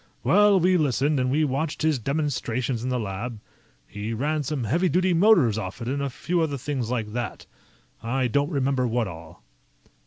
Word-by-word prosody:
Well, 205 -2 +5
we 180 +1 +3
listened, 145 -1 +1
and 125 0 +1
we 150 +4 +2
watched 150 +3 -2
his 155 -4 +2
demonstrations 130 -3 -2
in 130 - -2
the 125 -1 0
lab. 110 +2 -5 0.5
He 105 - -5
ran 150 +6 -1
some 145 -2 -3
heavy 170 - +1
duty 180 +1 +2
motors 165 - +4
off 95 -3 -6
it 115 - -5
and 140 +2 -1
a 140 - -1
few 170 +6 -1
other 150 -3 -1
things 130 -3 -3
like 110 -4 -2
that. 120 -1 -4 0.6
I 125 +3 -1
don't 140 +5 +1
remember 135 -4 0
what 120 -1 0
all." 80 -6 -11
135 Hz, 185 wpm, -25 LUFS, 115-155 Hz, 0.6 s, Well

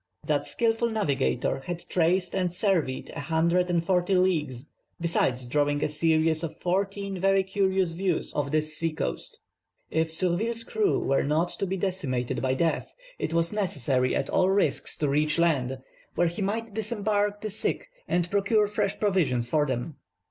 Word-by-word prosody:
That - - 0
skilful 230 0 +1
navigator 140 - 0
had 175 -1 -5
traced 180 +1 +1
and 185 -2 0
surveyed 180 -8 0
a - - -7
hundred 170 +5 +1
and 170 -1 +1
forty 180 +1 +2
leagues, 150 -8 +1 0.3
besides 130 -7 +1
drawing 145 +3 +1
a - - +2
series 160 +1 +2
of 165 -2 -5
fourteen 195 +1 -2
very 195 +1 +3
curious 190 -2 +1
views 180 0 -1
of 145 -1 -1
this 155 +1 0
sea 165 +1 0
coast. - - -4 0.5
If 160 0 +1
Surville's 190 +8 +1
crew 410 - +1
were 135 - +1
not 155 +5 +1
to 195 - -3
be 190 +1 -2
decimated 135 -10 -2
by 130 0 +1
death, 165 +4 -1 0.2
it - - -2
was 170 +3 +2
necessary 135 - 0
at 135 - -1
all 185 - +2
risks 150 -8 +1
to 150 - 0
reach 150 +2 +2
land, 135 -7 +1 0.4
where 175 - +3
he 175 +5 -6
might 220 +2 -2
disembark 205 -1 -1
the 215 - -4
sick, 215 - -2 0.2
and 175 -1 +1
procure 205 +2 +3
fresh 205 0 -1
provisions 150 - +1
for 150 -1 +2
them. 130 +4 -3
175 Hz, 165 wpm, -27 LUFS, 150-195 Hz, 0.5 s, very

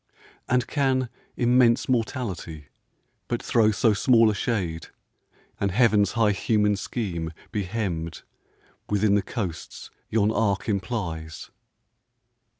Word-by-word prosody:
And 125 0 +2
can 130 -4 0 0.3
immense 120 -1 +3
Mortality 110 - -3 0.6
but - - -1
throw 110 -2 +3
So 110 +1 +3
small 115 +1 +4
a - - -2
shade, 95 -7 -2 0.7
and 100 - +1
Heaven's 105 -1 +3
high 115 -3 +3
human 105 0 +1
scheme 90 -6 -4 0.2
Be 100 -2 -2
hemmed 90 -6 -3 0.7
within 105 0 +2
the 100 - +3
coasts 95 -5 -6 0.2
yon 110 -1 +2
arc 105 -3 0
implies? 95 -7 -4
105 Hz, 110 wpm, -25 LUFS, 95-115 Hz, 0.7 s, small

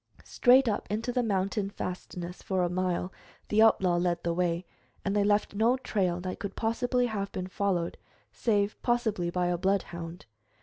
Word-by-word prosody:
Straight 255 +1 +5
up 210 - -1
into 225 +4 -1
the 250 - +2
mountain 200 -2 0
fastness, 180 -2 -6
for 190 -2 0
a 175 - +1
mile, 180 0 -1 0.4
the 215 +1 +4
outlaw 190 -5 +4
led 175 -1 0
the 170 - 0
way, 175 0 0 0.4
and 200 0 0
they 205 - +3
left 205 0 +2
no 230 +5 +3
trail 185 -8 0
that 185 0 -5
could 200 -1 -5
possibly 245 +2 +1
have 205 -4 -3
been 185 - -4
followed 185 -2 -1 0.4
save 205 - 0
possibly 220 -7 0
by 180 +1 0
a 175 -1 0
bloodhound. 175 -3 -2
195 Hz, 170 wpm, -29 LUFS, 180-220 Hz, 0.4 s, Straight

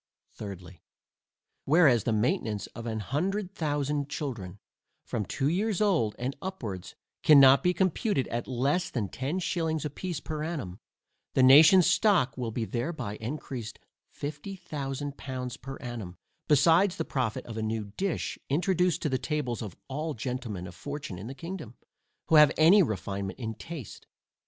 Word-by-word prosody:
Thirdly, 95 -3 -9 0.8
Whereas 140 - +5
the - - +1
maintainance 110 - 0
of 115 0 -7
a 110 -1 -2
hundred 180 - -2
thousand 145 -3 -1
children, 115 - -5 0.5
from 105 -3 -2
two 135 - -1
years 195 +5 0
old, 175 - +2
and 130 +3 -3
upwards, 110 - -6 0.3
cannot 140 -2 +8
be 180 - +3
computed 185 - 0
at 120 0 -3
less 140 +8 0
than 110 -6 -2
ten 140 - -3
shillings 160 -4 -1
a 150 - -3
piece 175 +1 -4
per 155 0 -4
annum, 140 - -4 0.6
the 130 - +5
nation's 155 +7 +8
stock 175 - +3
will 125 -3 -3
be 115 +1 -2
thereby 120 -3 -3
encreased 120 -2 -5 0.3
fifty 150 +7 -6
thousand 145 -5 -5
pounds 130 -2 -5
per 135 +2 -8
annum, 115 -8 -7 0.3
besides 165 +6 +5
the 160 - -3
profit 125 -7 -2
of 115 - -7
a 110 - -3
new 110 -2 -3
dish, 195 -2 -2
introduced 180 +3 +1
to 150 - +1
the 130 -1 0
tables 140 -7 -2
of 105 -6 -6
all 150 +3 -3
gentlemen 120 -6 -4
of 90 - -9
fortune 140 - -6
in 100 - -7
the 135 - -7
kingdom, 165 - -7 0.5
who 160 - +5
have 150 -1 +8
any 170 +6 +7
refinement 100 - -2
in 110 -3 -4
taste. 155 - -9
135 Hz, 155 wpm, -28 LUFS, 115-165 Hz, 0.8 s, cannot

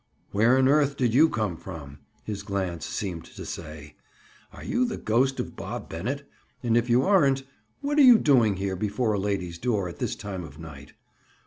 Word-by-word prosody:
"Where 115 +6 +4
on 130 0 +4
earth 140 0 +3
did 120 -3 +1
you 155 +6 +6
come 110 - -2
from?" 75 -6 -9 0.2
his 105 -2 -5
glance 95 -5 -3
seemed 90 -5 -4
to - - -10
say. 75 -2 -8 0.5
"Are - - -11
you 250 - 0
the 240 -3 -2
ghost 130 +5 +1
of - - -4
Bob - - -6
Bennett? 130 +12 -4 0.4
And 115 -2 +2
if 120 +1 +2
you 120 +2 +4
aren't, 140 -9 +3 0.4
what 290 +1 0
are - - +8
you 250 -4 +9
doing 120 - +3
here, 95 0 -2
before 105 +4 -1
a 100 - 0
lady's 95 -4 -2
door, 105 -7 0
at 85 - -9
this - - -2
time 95 -3 -6
of 75 -3 -11
night?" 75 -4 -11
105 Hz, 195 wpm, -26 LUFS, 90-135 Hz, 0.5 s, you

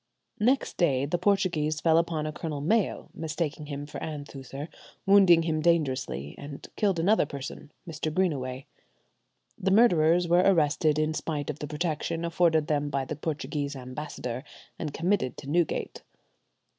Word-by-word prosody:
Next 255 +6 +1
day 140 -6 +2
the 170 +5 -1
Portuguese 170 -6 +1
fell 165 -1 +4
upon 165 -2 -1
a 155 - -2
Colonel 150 -1 -4
Mayo, 195 +8 0
mistaking 155 -1 -3
him 145 0 -5
for 150 - -7
Anthuser, 145 -2 -6 0.4
wounded 190 -4 +6
him 155 -2 0
dangerously, 135 - 0
and 145 0 -8
killed 200 -4 +1
another 175 -1 +3
person, 140 +1 -7 0.2
Mr. 155 -1 -3
Greenaway. 140 -7 -1 0.9
The 190 - 0
murderers 175 -5 +4
were 175 +1 +5
arrested 155 -4 +3
in 155 0 +1
spite 150 -2 -3
of 150 - -12
the 150 - -4
protection 165 +2 -2
afforded 165 -2 +2
them 145 -1 0
by 140 -1 -1
the 155 - -4
Portuguese 145 -1 -3
ambassador 130 -1 -6 0.4
and 155 - -3
committed 170 - 0
to - - -9
Newgate. 165 +2 -1
155 Hz, 145 wpm, -28 LUFS, 145-170 Hz, 0.9 s, wounded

